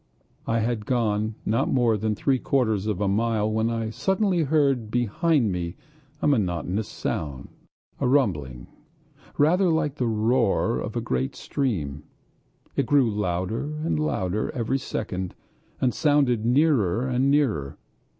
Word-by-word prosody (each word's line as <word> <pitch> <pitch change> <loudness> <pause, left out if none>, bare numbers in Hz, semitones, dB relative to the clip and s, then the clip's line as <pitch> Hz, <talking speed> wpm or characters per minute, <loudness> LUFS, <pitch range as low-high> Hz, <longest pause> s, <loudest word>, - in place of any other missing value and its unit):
I 115 0 +1
had 110 -2 -2
gone 110 -3 0
not 110 +2 +1
more 120 -3 +3
than 105 +1 -1
three 130 +4 +1
quarters 110 -8 0
of 105 -3 -1
a 100 - +1
mile 110 +1 +1
when 110 +1 +1
I 115 -1 -2
suddenly 190 - +1
heard 140 -6 +1
behind 120 - +1
me 85 -1 -3 0.5
a - - +3
monotonous 100 - 0
sound, 70 -4 -4 0.5
a - - +1
rumbling, 80 - 0 0.7
rather 175 +5 +4
like 155 -3 0
the 125 - 0
roar 115 0 +1
of - - -5
a - - 0
great 65 +1 -2
stream. 80 - -2 0.7
It - - 0
grew 135 -6 +4
louder 95 +3 -2 0.2
and 160 - 0
louder 105 -9 -1
every 125 +2 0
second, 95 -8 -4 0.4
and 125 -2 +1
sounded 140 -7 +2
nearer 125 - +2
and 130 +1 +1
nearer. 115 - +1
115 Hz, 140 wpm, -25 LUFS, 100-135 Hz, 0.7 s, rather